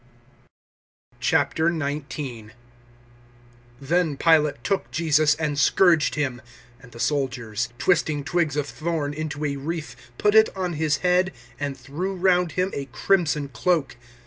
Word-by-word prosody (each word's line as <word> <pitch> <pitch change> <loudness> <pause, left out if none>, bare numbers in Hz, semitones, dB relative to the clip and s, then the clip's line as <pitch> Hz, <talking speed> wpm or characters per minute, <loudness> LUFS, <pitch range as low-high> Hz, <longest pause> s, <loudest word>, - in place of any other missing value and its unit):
019:001 145 -7 -1 1.3
Then 160 +1 0
Pilate 150 -6 +3
took 195 -1 -1
Jesus 155 -2 +3
and 150 -2 -2
scourged 165 +1 +4
Him. 130 -5 -2 0.4
019:002 - - -23
And 125 - -15
the 115 - -12
soldiers, 125 -4 -1
twisting 155 -4 +1
twigs 160 -1 0
of 145 - 0
thorn 155 -1 -3
into 155 -1 -4
a 140 -1 -2
wreath, 150 -2 -5 0.2
put 210 0 +2
it 220 0 +6
on 180 -2 -2
His 155 -1 +1
head, 180 +1 +3 0.3
and 140 -2 -3
threw 155 +10 -4
round 180 -2 +2
Him 185 +1 0
a 140 - -4
crimson 150 +1 0
cloak. 140 +4 0
150 Hz, 130 wpm, -24 LUFS, 140-175 Hz, 1.3 s, it